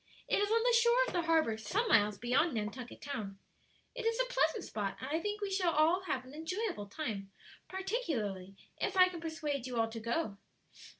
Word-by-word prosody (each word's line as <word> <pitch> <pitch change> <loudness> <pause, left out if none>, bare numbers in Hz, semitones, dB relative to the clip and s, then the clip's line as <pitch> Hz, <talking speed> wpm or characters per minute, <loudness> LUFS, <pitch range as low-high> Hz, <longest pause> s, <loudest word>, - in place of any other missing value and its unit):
It - - +2
is 410 0 +1
on 455 +1 +3
the 485 0 +4
shore 470 +1 +4
of - - -5
the 355 - +2
harbor 315 -10 +3
some 420 - 0
miles 210 - +4
beyond 255 - +2
Nantucket 225 +3 -5
Town. 215 -9 -5 0.6
It - - -5
is 455 +1 +1
a - - +3
pleasant 440 -6 +2
spot, 205 -2 -3
and 260 - -5
I 320 - +1
think 415 +4 -3
we 405 -1 -2
shall 345 -2 +3
have 260 -5 -1
an 260 - -12
enjoyable 325 - -3
time; 200 -5 -4 0.4
particularly 245 - -3 0.2
if - - -1
I 370 0 +8
can 345 -2 -7
persuade 300 -5 -3
you 245 -2 -2
all 225 0 +2
to 225 0 -6
go." 230 -1 -2
310 Hz, 195 wpm, -33 LUFS, -, 0.6 s, I